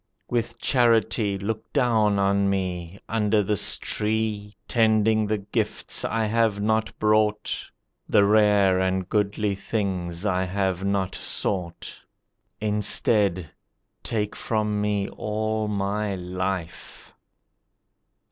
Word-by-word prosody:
With 120 -1 -2
charity 115 -4 +2
look 110 +3 -5
down 110 -7 +2
on 100 0 +2
me, 90 -1 -3
Under 105 -1 +1
this 105 0 +1
tree, 105 -1 -2
Tending 110 -1 +3
the 105 +1 0
gifts 100 +1 -3
I 115 -1 0
have 110 -1 +1
not 110 +1 0
brought, 105 0 +1 0.5
The 100 - +5
rare 105 -3 +4
and 95 -1 0
goodly 105 0 0
things 95 -3 -3
I 95 -2 +1
have 95 -1 -1
not 100 -1 0
sought. 90 -4 -4 0.6
Instead, 105 -4 +2 0.5
take 105 -2 -2
from 105 -2 -1
me 105 -1 0
all 110 0 -2
my 100 0 -1
life! 90 -1 -5
105 Hz, 105 wpm, -24 LUFS, 95-110 Hz, 0.6 s, The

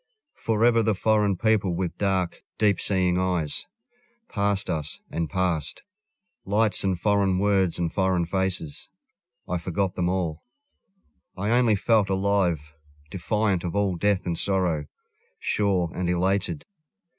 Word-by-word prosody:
Forever 115 +1 +2
the 110 -2 +1
foreign 105 -1 +2
people 105 -5 +1
with 90 0 -2
dark, 95 -3 0 0.2
deep 105 -3 +3
seeing 90 -2 +1
eyes 90 -5 -1 0.6
Passed 100 -1 0
us 75 -2 -2
and 80 -2 -2
passed. 90 -5 -1 0.6
Lights 105 +2 +1
and 95 -3 0
foreign 100 -2 +2
words 95 -3 +2
and 85 -2 -2
foreign 95 -3 +1
faces, 95 -4 -1 0.6
I 90 - -1
forgot 90 +2 -2
them 90 -1 -1
all; 85 -4 -2 0.9
I 100 +4 -1
only 120 -3 +4
felt 105 0 +2
alive, 95 -6 0 0.4
defiant 100 0 0
of 90 +1 -4
all 100 -3 +1
death 100 +2 +1
and 85 - -1
sorrow, 90 -6 0 0.5
Sure 95 -5 0
and 90 -1 -2
elated. 95 - 0
95 Hz, 130 wpm, -25 LUFS, 90-100 Hz, 0.9 s, only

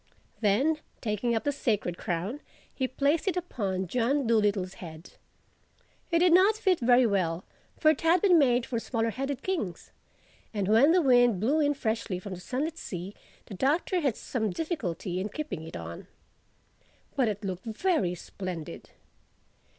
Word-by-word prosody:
Then 260 +9 +2 0.2
taking 230 +1 -1
up 225 - -1
the 290 - +1
Sacred 210 -10 -1
Crown 180 - -3 0.3
he 260 - -1
placed 285 +7 0
it 365 - +1
upon 200 - -2
John 250 - 0
Dolittle's 205 -5 +1
head. 160 -1 -10 1.0
It 335 - +3
did 345 0 +5
not 390 +4 +5
fit 380 -5 +2
very 245 +1 +5
well 185 -5 0 0.3
(for 310 - +5
it 310 - -3
had 330 +2 +4
been 360 -2 +5
made 245 -4 +3
for 235 - -2
smaller 230 -1 -1
headed 270 +2 -4
kings), 320 - -3 0.6
and 200 -2 0
when 230 +9 +6
the 355 0 +4
wind 245 -6 +5
blew 270 - +2
in 290 -1 +2
freshly 220 -6 -2
from 185 +1 -7
the 180 - -7
sunlit 300 - -3
sea 180 +2 -6 0.3
the - - -10
Doctor 300 - +1
had 275 -7 +1
some 220 -4 -2
difficulty 185 - -3
in 200 +3 -2
keeping 295 - -5
it - - -7
on. 85 0 -8 1.1
But 260 -3 +2
it 210 0 -3
looked 185 -1 -4
very 225 - 0
splendid. 170 - -7
235 Hz, 160 wpm, -28 LUFS, 190-295 Hz, 1.1 s, when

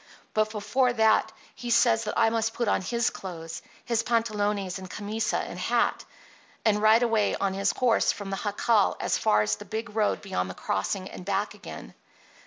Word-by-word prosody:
But 215 0 +2
before 225 +5 +1
that 220 -1 +3 0.2
he 240 - -7
says 230 -1 +4
that 210 - -3
I 225 - +4
must 225 0 -1
put 235 - -1
on - - +2
his 235 +4 0
clothes, 165 -3 -7 0.2
his 235 -2 +1
pantalones 210 -5 -1
and 185 -1 -9
camisa 210 +3 -2
and - - -5
hat, - - +1 0.6
and 210 -1 +3
ride 220 +2 +5
away 225 -3 +2
on 195 -1 -1
his 200 +1 +1
horse 240 -3 +3
from 200 -2 -7
the 195 - -2
jacal 205 0 +2
as - - 0
far 105 0 +3
as 105 0 0
the - - -10
big 220 -1 -5
road 215 -2 +1
beyond 140 - -2
the 90 - -7
crossing 185 - -2
and 185 - -9
back 200 +2 -1
again. - - -10
210 Hz, 190 wpm, -27 LUFS, 195-225 Hz, 0.6 s, ride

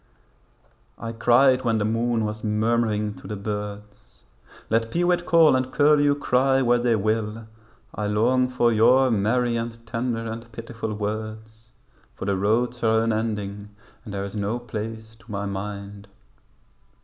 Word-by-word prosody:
I 115 - -5
cried 125 +3 +4
when 115 -2 +1
the 105 - 0
moon 115 0 0
was 105 0 -5
murmuring 110 -1 0
to - - -11
the 105 - -4
birds, 105 0 -7 0.4
'Let 115 +1 +1
peewit 175 +3 +1
call 165 -4 +6
and 130 0 -1
curlew 145 0 +4
cry 135 -1 +2
where 120 0 +3
they 120 -1 +2
will, 110 +1 -1 0.5
I 105 - -3
long 125 +5 +2
for 120 -2 +2
your 125 +4 +4
merry 115 +3 +1
and 115 0 -6
tender 115 0 -3
and 115 +1 -7
pitiful 115 -1 -6
words, 110 +1 -6 0.5
For - - -6
the 100 -1 +1
roads 115 +5 0
are 110 0 +3
unending 105 -2 -3 0.3
and 110 - -9
there 100 0 -2
is 100 +1 -8
no 105 +3 -1
place 110 -1 -7
to 115 0 -15
my 100 0 -3
mind.' 100 0 -6
115 Hz, 150 wpm, -24 LUFS, 105-120 Hz, 0.5 s, call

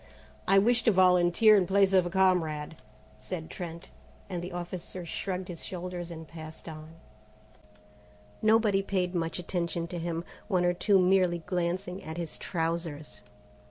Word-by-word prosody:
"I 195 - +5
wish 235 +4 +4
to 225 - +6
volunteer 185 +3 +5
in 190 -3 +3
place 195 0 +3
of 185 -2 +4
a - - -3
comrade," 170 -5 +1 0.4
said 160 +6 -6
Trent, 170 0 -7 0.4
and 175 -2 -3
the 180 +2 -6
officer 175 0 -6
shrugged 185 +2 -4
his 175 -3 -7
shoulders 180 -1 -5
and 160 -1 -8
passed 160 0 -10
on. 155 0 -9 1.5
Nobody 215 -2 +4
paid 185 -2 -1
much 165 -2 -1
attention 170 -1 -2
to 175 -1 -4
him, 165 0 -3 0.2
one 185 -4 +2
or 175 - +3
two 195 +3 +3
merely 180 -2 +3
glancing 180 +1 -2
at 160 +1 -6
his 170 -2 -5
trousers. 160 - -3
175 Hz, 150 wpm, -29 LUFS, 165-190 Hz, 1.5 s, to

